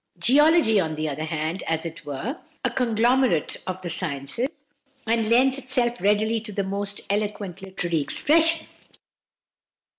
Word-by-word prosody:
Geology, 295 -4 +4
on 160 -4 -1
the 155 0 -2
other 155 +1 -3
hand, 160 +2 -2
is, - - -8
as 160 +1 -1
it 165 -2 -8
were, 205 - -4 0.3
a 255 - +1
conglomerate 240 - +2
of 185 0 -3
the 175 - -4
sciences, 230 - -3 0.4
and 225 -1 +1
lends 260 +3 +4
itself 245 -5 0
readily 215 +3 +2
to 220 -1 -8
the 200 0 -2
most 200 +1 -3
eloquent 205 -2 -3
literary 175 -4 -2
expression. 325 - +2
210 Hz, 145 wpm, -24 LUFS, 170-250 Hz, 0.4 s, Geology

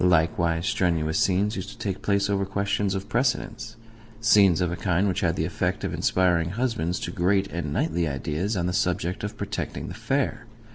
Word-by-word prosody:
Likewise 85 -1 +2
strenuous 80 -5 +1
scenes 100 +3 +2
used 95 - -5
to - - -11
take 100 -4 -3
place 100 -1 +1
over 100 -1 +1
questions 100 0 -1
of 95 +1 -4
precedence 120 -2 -1 0.4
scenes 100 -6 +5
of 90 -1 0
a - - -2
kind 90 +3 +1
which 95 0 0
had 85 -4 +1
the - - 0
effect - - -2
of - - -2
inspiring 85 -3 +2
husbands 110 -5 -1
to - - -4
great 95 +2 +2
and 85 -3 -3
knightly 100 - 0
ideas 75 - -2
on 85 - 0
the 90 - -1
subject 90 0 -1
of 105 - -4
protecting - - -4
the - - -6
fair. 135 -3 -1
95 Hz, 190 wpm, -25 LUFS, 85-100 Hz, 0.4 s, scenes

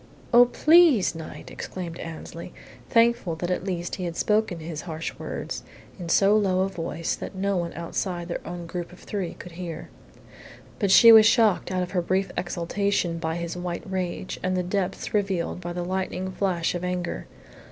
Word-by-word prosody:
"Oh, 240 +1 +9
please, 305 - +5
Knight!" 160 -1 -9
exclaimed 175 -3 -6
Annesley, 165 +1 -8 0.4
thankful 230 -7 +3
that 175 +2 -3
at 180 - -1
least 180 -2 -3
he 185 - -3
had 170 -1 -4
spoken 210 -4 +1
his 155 -1 -6
harsh 165 -2 -5
words - - -5 0.4
in 175 -2 -6
so 200 +4 +5
low 190 -3 +2
a 190 - +1
voice 165 -2 -3
that - - -7
no 200 +1 0
one 170 -2 -1
outside 175 +1 -3
their 175 - -4
own 175 0 -6
group 175 +1 -5
of 180 - -13
three 190 -4 -4
could 180 - -10
hear. 170 -1 -7 0.9
But 200 - +1
she 230 +4 +9
was 220 -1 +9
shocked 225 -4 +3
out 185 -1 0
of 180 - -6
her 180 - +1
brief 190 +3 0
exultation 175 0 -1
by 160 0 -2
his 170 0 -4
white 175 -1 -4
rage 185 -1 -3
and 185 0 0
the 180 - 0
depths 190 +1 -2
revealed 195 -4 -1
by 175 -1 -5
the 175 0 -3
lightning 185 0 -2
flash 185 -3 0
of 175 0 -4
anger. 180 -1 -3
180 Hz, 185 wpm, -25 LUFS, 170-195 Hz, 0.9 s, Oh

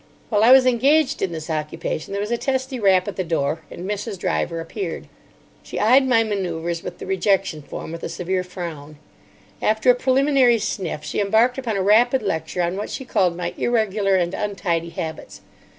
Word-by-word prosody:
While 210 -2 +2
I 235 - +7
was 260 -1 +8
engaged 270 +5 +3
in 190 - 0
this 160 -1 -6
occupation 155 +1 -4
there 200 - -2
was 210 +2 -3
a - - +3
testy 260 -1 -2
rap 190 -3 +3
at 205 - -5
the 185 - 0
door, 160 -2 -1
and 180 - -7
Mrs. 205 0 -4
Driver 170 -1 -1
appeared. 165 - -5 0.5
She - - -6
eyed 260 +5 +5
my 230 -3 +4
manoeuvres 175 -5 -3
with 175 - -7
the - - -8
rejection 190 -3 0
form 150 - -8
with 165 - -7
a - - -4
severe 180 +2 -2
frown. 160 -5 -8 0.6
After 220 +3 +4
a - - +4
preliminary 260 -1 +3
sniff 180 -7 -3
she - - -3
embarked 225 +6 +2
upon 230 -6 -2
a 190 - 0
rapid 240 +5 +4
lecture 170 -2 -2
on 175 +2 -1
what 205 - -4
she 265 - -6
called 180 -7 +1
my 175 -1 -3
irregular 210 -4 +1
and 175 -1 0
untidy 180 -5 -2
habits. 160 -1 -7
195 Hz, 190 wpm, -22 LUFS, 170-235 Hz, 0.6 s, was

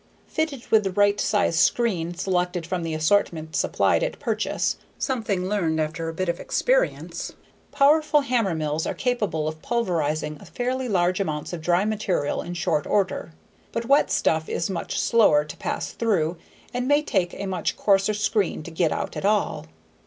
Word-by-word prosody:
Fitted 305 -6 -3
with 220 -1 +5
the 195 - 0
right 205 +2 +3
size 200 -5 +2
screen 175 -8 +1
selected 180 -1 -1
from 175 +1 -2
the 165 -1 -3
assortment 160 -1 +1
supplied - - +2
at - - -2
purchase, - - -1 0.2
something 220 -8 -1
learned 170 -6 0
after 160 +1 -2
a - - -5
bit 185 +2 -2
of 170 0 -1
experience, - - 0 0.4
powerful 300 +1 +4
hammermills 165 - 0
are - - -2
capable 210 -11 -1
of 155 0 -5
pulverizing 155 -10 -1
fairly 255 +1 -3
large 180 -2 +2
amounts 155 -4 -3
of 170 - -4
dry 175 +4 +2
material 205 -9 -1
in 175 +1 -6
short 160 -3 0
order. 190 -4 0 0.4
But 230 - -3
wet 280 +4 +4
stuff 160 0 +1
is 170 - -1
much 170 -3 -3
slower 155 -11 +4
to 150 - -9
pass - - -3
through 180 -8 0 0.4
and 245 +1 -1
may 290 +1 +4
take 185 -10 0
a 200 - -5
much 190 -2 -2
coarser 200 +1 +3
screen 210 -5 0
to 170 - -8
get 160 0 +1
out - - -3
at - - -4
all. 200 - +1
190 Hz, 165 wpm, -24 LUFS, 165-225 Hz, 0.4 s, with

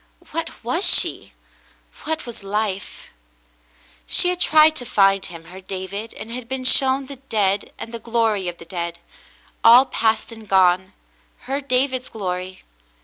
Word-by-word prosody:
What 330 -4 -5
was 255 - -1
she? - - +2 0.7
What 320 0 -3
was 235 -4 -9
life? 200 -1 -3 1.0
She 355 - +2
had 360 0 -2
tried 310 -2 +5
to - - -5
find 195 -1 +3
him, 170 -2 -9
her 185 +3 -12
David, 190 +3 -6
and 225 - -9
had 245 0 -7
been 265 -1 -3
shown 265 +1 +4
the 275 +1 -10
dead, 205 -6 -1
and 230 - -8
the 230 - -5
glory 225 -5 0
of 175 -1 -4
the - - -12
dead 170 0 -5 0.3
— - - -31
all 240 +3 +8
past 225 -2 0
and 220 -2 -12
gone 185 0 +3 0.2
— - - -37
her 275 +2 -2
David's 255 -1 -1
glory. 185 -2 -5
220 Hz, 160 wpm, -21 LUFS, 190-260 Hz, 1.0 s, all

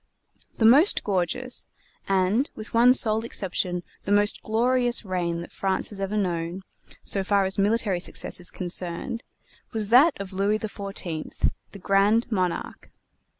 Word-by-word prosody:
The 225 - +2
most 285 - +5
gorgeous, 205 +6 -2 0.4
and 195 +8 +2
with 215 - -9
one 245 +2 +6
sole 220 -2 +2
exception 180 -5 -2 0.2
the 200 - -5
most 205 0 +3
glorious 245 +1 +1
reign 175 -3 -2
that 170 - -10
France 195 -1 -1
has 200 - -7
known, 190 -3 -2 0.4
so 195 - 0
far 200 0 +2
as 190 +1 -2
military 205 -2 +1
success 175 - -3
is 180 - -2
concerned, 180 +5 -2 0.5
was 215 -2 0
that 270 +5 +5
of 195 -1 -6
Louis 200 +3 +1
XIV, 200 -6 -4 0.2
the - - -10
Grand 200 +5 +2
Monarque. 185 -4 -2
200 Hz, 140 wpm, -25 LUFS, 185-225 Hz, 0.5 s, one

